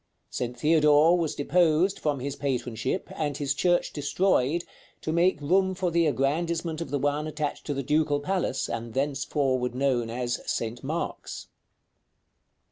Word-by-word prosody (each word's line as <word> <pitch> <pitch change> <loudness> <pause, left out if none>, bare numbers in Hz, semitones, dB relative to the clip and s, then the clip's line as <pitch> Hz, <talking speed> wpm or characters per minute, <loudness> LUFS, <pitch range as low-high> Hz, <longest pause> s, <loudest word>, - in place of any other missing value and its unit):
St. 125 0 -3
Theodore 150 +3 +5
was 165 -4 -1
deposed 170 +4 +2
from 145 -4 -1
his 140 +1 -3
patronship, 130 - -2
and 145 -3 -2
his 140 -2 0
church 175 +5 +1
destroyed, 150 +1 +1 0.4
to 155 - -2
make 170 -1 +3
room 190 +6 +2
for 180 -1 -1
the 170 -1 +3
aggrandizement 160 +3 -1
of 165 - -4
the 145 - 0
one 145 +2 0
attached 150 -1 -4
to 145 - -1
the 140 - -2
Ducal 150 +1 +2
Palace, 175 -4 -1
and 115 -1 -5
thenceforward 135 -2 0
known 130 -3 +1
as 120 +1 -2
"St. 115 +2 -3
Mark's." 160 +5 -4
145 Hz, 145 wpm, -27 LUFS, 135-165 Hz, 0.4 s, Theodore